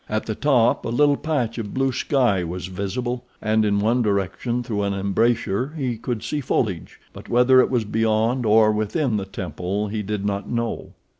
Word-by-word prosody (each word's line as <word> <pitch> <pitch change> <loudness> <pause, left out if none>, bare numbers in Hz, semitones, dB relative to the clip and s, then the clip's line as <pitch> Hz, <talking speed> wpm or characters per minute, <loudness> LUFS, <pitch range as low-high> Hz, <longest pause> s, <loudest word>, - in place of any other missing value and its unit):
At 110 0 -1
the 110 - -2
top 125 -1 +2
a - - -3
little 145 +4 +3
patch 130 -7 -2
of 105 -3 -6
blue 135 0 +1
sky 125 - +1
was 85 +1 -5
visible, 120 +7 -3 0.2
and, 110 0 +1
in 100 -1 +2
one 115 +5 +2
direction, 105 +4 -1
through 105 -3 -2
an 100 -1 -1
embrasure, 110 +5 0
he 130 -5 -1
could 115 0 -4
see 150 - -2
foliage, 105 - -2
but - - -12
whether 125 +2 +5
it - - +1
was 120 -4 0
beyond 110 +3 +1
or 110 0 +5
within 110 +4 0
the 100 - -3
temple 95 +2 -4
he 105 +1 -3
did 105 0 -3
not 100 0 -2
know. 115 -1 -3
110 Hz, 190 wpm, -22 LUFS, 100-125 Hz, 0.2 s, whether